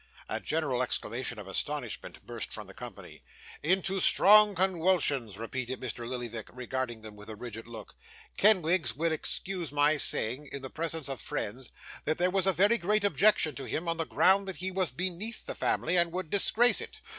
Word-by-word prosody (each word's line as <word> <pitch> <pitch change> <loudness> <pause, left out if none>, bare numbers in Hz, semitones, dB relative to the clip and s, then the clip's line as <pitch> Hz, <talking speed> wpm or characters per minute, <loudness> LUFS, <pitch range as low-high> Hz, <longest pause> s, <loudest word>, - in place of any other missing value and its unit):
A - - -3
general 145 -6 -1
exclamation 125 0 -2
of 105 -2 -9
astonishment 125 +5 -4
burst - - -6
from - - -7
the - - -13
company. - - -10 0.4
'Into 190 +4 +1
strong 210 +2 +6
conwulsions,' 170 - +1
repeated 125 +3 -4
Mr. 120 -1 -5
Lillyvick, 120 -3 -5
regarding 125 -2 -4
them 110 -1 -9
with 105 +1 -11
a 110 - -6
rigid 115 0 -8
look. 115 -3 -10 0.4
'Kenwigs 185 -4 +3
will 165 +1 0
excuse 175 +1 -2
my 145 +1 +3
saying, 135 +1 0
in 140 - -6
the 135 - -7
presence 160 -2 -3
of 135 -4 -5
friends, 120 +5 -5 0.4
that 155 - 0
there 180 +1 +1
was 190 0 +1
a - - +6
very 205 +6 +3
great 210 +3 +1
objection 205 -6 +3
to 135 - -6
him, 165 +6 -3
on 165 0 0
the 165 - -1
ground 195 +1 +3
that 190 - -4
he 190 +1 -3
was 185 -3 0
beneath 185 - -4
the - - -4
family, 170 - 0
and 170 -1 +3
would 180 -2 -5
disgrace 230 +4 +5
it. - - -9
155 Hz, 185 wpm, -29 LUFS, 125-185 Hz, 0.4 s, strong